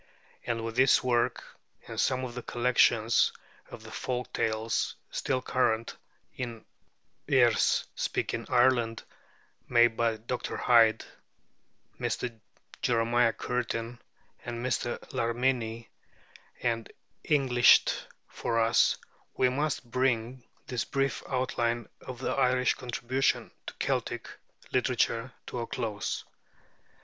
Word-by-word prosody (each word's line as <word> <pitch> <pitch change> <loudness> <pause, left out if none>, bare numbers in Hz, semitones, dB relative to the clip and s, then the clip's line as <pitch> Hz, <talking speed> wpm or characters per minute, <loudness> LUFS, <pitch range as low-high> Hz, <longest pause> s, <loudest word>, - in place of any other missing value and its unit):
And 115 -1 -1
with 115 +1 -5
this 130 0 +5
work, 120 -2 +1 0.4
and - - -2
some 130 -1 +1
of 120 - -7
the 125 - -5
collections 120 -2 +3 0.4
of 110 - -10
the 110 - -11
folk 125 +1 -4
tales 110 0 -1 0.2
still 130 -1 -1
current 115 -3 0 0.4
in 120 -3 -6 0.6
Erse - - +4
speaking - - -2
Ireland, 120 -2 +3 0.7
made 120 -1 +5
by 115 -1 +1
Dr. 120 +3 -4
Hyde, 115 -2 +4 0.9
Mr. 120 -2 -2 0.5
Jeremiah 115 0 +3
Curtin, 120 0 -3 0.4
and 120 0 -5
Mr. 120 -1 -1 0.2
Larminie, 115 -1 -1 0.7
and 115 -2 -1 0.3
Englished 130 -5 +4 0.2
for 115 - -2
us, 115 0 +4 0.4
we 130 - +4
must 135 -2 -2
bring 125 -1 0 0.2
this 125 -2 -2
brief 135 0 -1
outline 120 -3 -1
of 125 - -8
the 130 - -2
Irish 125 -1 +2
contribution 125 +1 -1 0.2
to - - -6
Celtic - - -2 0.4
literature 125 -1 +1
to 125 - -5
a 115 - -3
close. 110 -5 -3
120 Hz, 110 wpm, -29 LUFS, 115-125 Hz, 0.9 s, this